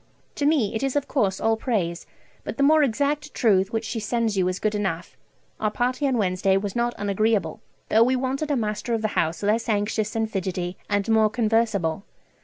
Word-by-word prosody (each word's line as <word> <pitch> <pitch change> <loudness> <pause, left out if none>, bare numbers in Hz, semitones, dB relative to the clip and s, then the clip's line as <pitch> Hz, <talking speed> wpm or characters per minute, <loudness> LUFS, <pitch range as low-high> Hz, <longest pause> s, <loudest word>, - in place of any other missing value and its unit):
To 285 - 0
me 285 -10 +2
it 220 - -2
is 270 0 -1
of 285 -1 0
course 200 -9 0
all 225 0 +2
praise, 195 -8 -2 0.4
but - - -6
the 280 - +2
more 310 +2 +5
exact 290 +3 0
truth 195 -3 +3
which 225 0 -2
she 225 +1 -3
sends 220 0 -1
you 185 -2 +2
is 185 0 -1
good 215 +1 -1
enough.... 190 -4 -3 0.4
Our 215 - +1
party 255 +6 0
on 260 -2 +1
Wednesday 190 -1 +2
was 200 0 -3
not 240 0 0
unagreeable, 205 -3 0 0.3
though 220 - +4
we 255 +2 +2
wanted 265 +4 -2
a 290 - +2
master 215 0 -1
of 220 - -3
the 215 - +1
house 165 -1 -1
less 220 +3 +1
anxious 210 +1 -1
and 225 0 0
fidgety, 185 -3 -3
and 205 0 0
more 220 -1 +4
conversable. 215 -7 0
220 Hz, 205 wpm, -24 LUFS, 195-240 Hz, 0.4 s, more